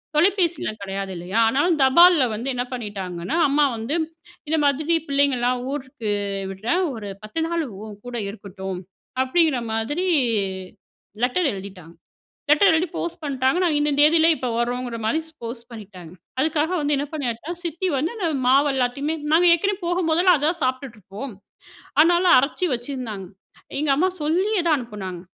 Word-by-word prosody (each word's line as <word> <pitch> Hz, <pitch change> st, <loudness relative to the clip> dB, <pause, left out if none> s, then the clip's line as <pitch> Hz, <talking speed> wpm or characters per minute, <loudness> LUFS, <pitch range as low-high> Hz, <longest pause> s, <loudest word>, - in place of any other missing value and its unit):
தொலைபேசிலாம் 340 Hz, -, +1 dB
கிடையாது 195 Hz, 0 st, -4 dB
இல்லையா? 180 Hz, +6 st, -2 dB
ஆனாலும் 295 Hz, +6 st, +2 dB
தபால்ல 340 Hz, +3 st, +6 dB
வந்து 240 Hz, +5 st, -5 dB
என்ன 245 Hz, -, -1 dB
பண்ணீட்டாங்கன்னா, 200 Hz, -, -4 dB
அம்மா 290 Hz, +1 st, +3 dB
வந்து 225 Hz, +8 st, -2 dB, 0.5 s
இந்த 320 Hz, -, +1 dB
மாதிரி 300 Hz, +4 st, +2 dB
பிள்ளைங்கலாம் 255 Hz, -3 st, +2 dB
ஊருக்கு 260 Hz, -6 st, -4 dB, 0.4 s
விடுறேன், 230 Hz, -, -1 dB
ஒரு 210 Hz, -3 st, -7 dB
பத்து 215 Hz, +10 st, -4 dB
நாள் 335 Hz, -1 st, -1 dB, 0.2 s
உன்கூட 215 Hz, +4 st, -9 dB
இருக்கட்டும், 190 Hz, -2 st, -7 dB, 0.4 s
அப்டிங்கிற 305 Hz, 0 st, +2 dB
மாதிரி 290 Hz, +12 st, -1 dB, 1.2 s
லெட்டர் 280 Hz, +5 st, +2 dB
எழுதிட்டாங்க. 190 Hz, -4 st, -9 dB, 0.6 s
லெட்டர் 315 Hz, +7 st, +6 dB
எழுதி 325 Hz, +3 st, +2 dB
போஸ்ட் 345 Hz, 0 st, -4 dB
பண்ணிட்டாங்க. 265 Hz, +1 st, +1 dB
நாங்க 325 Hz, -4 st, +2 dB
இந்த 295 Hz, 0 st, +1 dB
தேதியில 320 Hz, +2 st, +5 dB
இப்போ 255 Hz, -, -4 dB
வரோங்கிற 245 Hz, 0 st, -2 dB
மாதிரி 270 Hz, +8 st, +1 dB
ஸ் 320 Hz, -, -20 dB
போஸ்ட் 235 Hz, 0 st, -7 dB
பண்ணிட்டாங்க. 190 Hz, -7 st, -11 dB, 0.3 s
அதுக்காக 310 Hz, +2 st, +1 dB
வந்து 290 Hz, 0 st, +1 dB
என்ன 285 Hz, -, -1 dB
பண்ணியாச்சா, 280 Hz, 0 st, -3 dB
சித்தி 340 Hz, +2 st, -2 dB
வந்து 310 Hz, -, -1 dB
அந்த 385 Hz, -, -2 dB, 0.2 s
மாவு 275 Hz, +3 st, +5 dB
எல்லாத்தையுமே, 265 Hz, +4 st, -1 dB, 0.2 s
நாங்க 335 Hz, +3 st, +5 dB
ஏற்கனவே 395 Hz, +3 st, 0 dB
போகும்போதெல்லாம் 350 Hz, 0 st, +3 dB
அதுதான் 320 Hz, +4 st, 0 dB
சாப்பிட்டுட்டு 255 Hz, -2 st, -2 dB
இருப்போம். 210 Hz, +7 st, -8 dB, 0.6 s
அதனால, 345 Hz, +3 st, +5 dB
அரைச்சி 300 Hz, +7 st, 0 dB
வச்சிருந்தாங்க. 240 Hz, -5 st, -5 dB, 0.5 s
எங்க 300 Hz, -, -1 dB
அம்மா 360 Hz, +7 st, +2 dB
சொல்லியே 365 Hz, +6 st, +1 dB
தான் 310 Hz, -, +4 dB
அனுப்பினாங்க, 205 Hz, -8 st, -7 dB
275 Hz, 140 wpm, -23 LUFS, 225-320 Hz, 1.2 s, தபால்ல